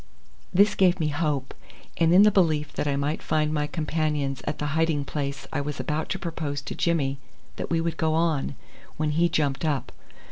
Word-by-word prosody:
This 205 +3 +5
gave 185 -2 +3
me 155 -2 +1
hope, 145 -3 -1 0.4
and 165 -1 +3
in 185 +3 +8
the 210 - +6
belief 155 -6 +2
that - - -2
I 140 - +1
might 145 +3 -1
find 155 -1 0
my 150 -1 0
companions 150 -3 -1
at 150 - -1
the 150 - -3
hiding 160 -3 +1
place 140 -1 -4
I - - 0
was 145 0 -4
about 155 +1 -2
to 190 - -1
propose 160 -6 -4
to - - -5
Jimmy 140 -5 0 0.4
that - - -4
we 165 - +1
would 165 -1 -2
go 160 0 +1
on, 160 -4 0 0.4
when 155 -1 0
he 170 +3 +3
jumped 145 -3 0
up. 145 -5 -1
155 Hz, 200 wpm, -26 LUFS, 145-165 Hz, 0.4 s, in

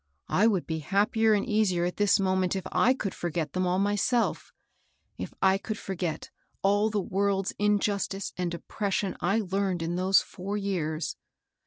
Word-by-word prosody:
I 210 +4 +4
would 195 -6 +1
be 160 -1 -3
happier 215 - +2
and 205 - 0
easier 210 -7 +1
at 180 - -3
this 205 -1 +4
moment 185 -1 +1
if 190 - -3
I 255 - +4
could 200 -7 -3
forget 165 -3 -3
them 185 0 0
all 180 +1 +1
myself, 205 +4 0 0.3
— - - -44
if - - -5
I 190 0 +4
could 215 +1 -4
forget 180 -5 -4 0.3
all 205 +2 +3
the 210 -1 0
world's 195 0 0
injustice 205 -1 0
and 180 -1 -2
oppression 200 +2 -2
I 195 +6 +2
learned 190 -3 -1
in 170 +2 -2
those 190 +1 +5
four 200 +3 -5
years. 170 -6 -2
195 Hz, 170 wpm, -28 LUFS, 180-205 Hz, 0.3 s, those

